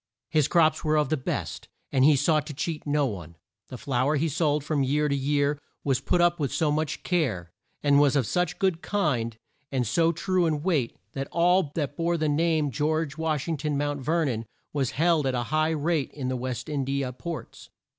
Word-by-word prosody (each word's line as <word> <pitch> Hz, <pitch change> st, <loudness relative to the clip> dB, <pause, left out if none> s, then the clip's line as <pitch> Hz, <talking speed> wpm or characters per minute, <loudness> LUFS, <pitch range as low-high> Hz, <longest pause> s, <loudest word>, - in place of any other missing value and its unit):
His 155 Hz, -3 st, +3 dB
crops 160 Hz, -2 st, +3 dB
were 155 Hz, -1 st, +2 dB
of 150 Hz, -3 st, +2 dB
the 155 Hz, -, +2 dB
best, 130 Hz, -, -4 dB, 0.2 s
and 130 Hz, -, +3 dB
he 150 Hz, +1 st, +6 dB
sought 150 Hz, +2 st, +2 dB
to 150 Hz, -, -7 dB
cheat 155 Hz, +1 st, -4 dB
no 145 Hz, 0 st, +2 dB
one. 85 Hz, -, -6 dB, 0.3 s
The 130 Hz, -, -8 dB
flour 135 Hz, +3 st, 0 dB
he 160 Hz, +3 st, +1 dB
sold 150 Hz, -1 st, +1 dB
from 150 Hz, -1 st, 0 dB
year 145 Hz, +3 st, +1 dB
to 140 Hz, -, 0 dB
year 145 Hz, +1 st, +1 dB, 0.2 s
was 135 Hz, -2 st, +1 dB
put 175 Hz, -, +1 dB
up 175 Hz, 0 st, +3 dB
with 140 Hz, -3 st, -1 dB
so 155 Hz, -2 st, +1 dB
much 155 Hz, 0 st, -2 dB
care, 120 Hz, -, -1 dB, 0.3 s
and 145 Hz, -1 st, +5 dB
was 145 Hz, -1 st, +4 dB
of 135 Hz, -4 st, +2 dB
such 180 Hz, -, 0 dB
a -, -, -31 dB
good 185 Hz, -4 st, +1 dB
kind 130 Hz, -, -1 dB, 0.3 s
and 130 Hz, -3 st, 0 dB
so 165 Hz, +9 st, +2 dB
true 180 Hz, +1 st, +1 dB
in 150 Hz, -2 st, -1 dB
weight 155 Hz, -10 st, 0 dB, 0.2 s
that 135 Hz, 0 st, -3 dB
all 175 Hz, -2 st, +3 dB
that 145 Hz, -3 st, -2 dB
bore 170 Hz, +1 st, 0 dB
the 155 Hz, -1 st, 0 dB
brand 155 Hz, 0 st, +2 dB
of -, -, -9 dB
George 155 Hz, +2 st, 0 dB
Wash 155 Hz, -3 st, -1 dB
ing 165 Hz, -2 st, -1 dB
ton, 145 Hz, 0 st, -1 dB
Mount 145 Hz, 0 st, -1 dB
Ver 160 Hz, +4 st, +1 dB
non, 115 Hz, -4 st, -2 dB, 0.3 s
was 135 Hz, -4 st, 0 dB
held 160 Hz, -3 st, +3 dB
at 130 Hz, -, 0 dB
a 120 Hz, -, 0 dB
high 155 Hz, 0 st, +3 dB
rate 160 Hz, -1 st, 0 dB
in 130 Hz, -3 st, -4 dB
the 130 Hz, -, -1 dB
West 125 Hz, -1 st, -4 dB
In 145 Hz, -3 st, -1 dB
di 135 Hz, +1 st, -1 dB
a 125 Hz, -1 st, -4 dB
ports. 170 Hz, +5 st, -7 dB
150 Hz, 225 wpm, -26 LUFS, 135-160 Hz, 0.3 s, he